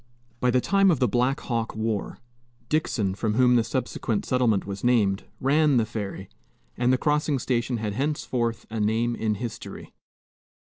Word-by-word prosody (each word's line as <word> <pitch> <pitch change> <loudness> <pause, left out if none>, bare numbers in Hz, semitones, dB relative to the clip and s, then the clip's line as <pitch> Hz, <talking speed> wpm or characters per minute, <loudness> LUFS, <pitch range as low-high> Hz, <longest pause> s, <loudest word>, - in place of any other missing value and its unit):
By 125 - +2
the 125 +1 +3
time 195 +4 +3
of 165 - +3
the 125 - +2
Black 125 +5 +1
Hawk 115 -3 -2
war, 110 -2 -2 0.5
Dixon, 115 -11 0
from 105 +2 -1
whom 125 0 +5
the 120 - +4
subsequent 115 -2 -2
settlement 120 -6 +1
was 100 0 -6
named, 105 -6 +2
ran 145 +1 +3
the 115 - +3
ferry, 100 -3 -5 0.5
and 125 +1 +2
the 130 - +3
crossing 150 0 +1
station 120 -1 -1
had 105 -2 -3
henceforth 125 -3 -2
a 110 - -3
name 115 +3 +1
in 110 -2 -1
history. 115 +2 -7
120 Hz, 160 wpm, -25 LUFS, 110-130 Hz, 0.5 s, whom